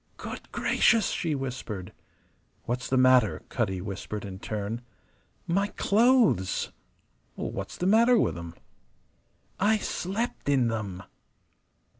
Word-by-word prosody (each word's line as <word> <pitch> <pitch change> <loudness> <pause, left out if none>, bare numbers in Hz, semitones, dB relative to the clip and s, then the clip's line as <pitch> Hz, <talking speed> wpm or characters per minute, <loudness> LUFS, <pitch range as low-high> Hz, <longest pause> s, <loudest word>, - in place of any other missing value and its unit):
"Good - - -8
gracious!" 225 -4 +3
she 160 -3 -1
whispered. 125 -8 -5 0.7
"What's 125 +2 -3
the 130 - +2
matter?" 130 -4 +4
Cutty 95 -6 -1
whispered 100 +1 -5
in 95 -1 -7
turn. 105 +3 -4 0.6
"My 195 +4 +1
clothes!" 225 - +3 0.6
"What's - - -5
the 180 - -2
matter 230 +5 +5
with - - +1
'em?" 85 -1 -8 1.0
"I 215 +3 +4
slept 200 -2 -3
in 130 -4 +3
them!" 100 -4 -4
130 Hz, 110 wpm, -27 LUFS, -, 1.0 s, matter